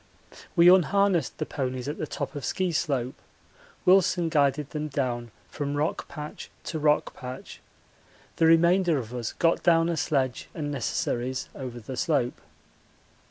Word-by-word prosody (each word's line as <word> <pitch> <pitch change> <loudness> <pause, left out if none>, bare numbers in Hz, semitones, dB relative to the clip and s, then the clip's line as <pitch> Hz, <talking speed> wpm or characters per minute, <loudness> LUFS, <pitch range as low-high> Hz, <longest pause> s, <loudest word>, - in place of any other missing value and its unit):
We 170 -1 +6
unharnessed 185 -2 +4
the - - -2
ponies 130 -2 -3
at 145 - -4
the 155 - -3
top - - -4
of 145 - -6
Ski 185 +5 -1
slope 135 -5 -1 0.6
Wilson 180 -2 +4
guided 145 -2 +1
them 155 0 -3
down 125 -4 -2 0.2
from 145 0 -4
rock 150 +2 -1
patch 150 0 -8
to 160 - -4
rock 150 0 +2
patch; 130 0 -8 0.8
the 165 - +4
remainder 170 0 +4
of 120 -2 -5
us 120 -3 -4
got 165 0 +2
down 165 -1 +4
a 170 - 0
sledge 130 -5 -1
and 145 -3 -3
necessaries 130 -1 -2
over 125 -3 -7
the 125 +4 -7
slope. 130 -6 0
150 Hz, 150 wpm, -27 LUFS, 130-165 Hz, 0.8 s, We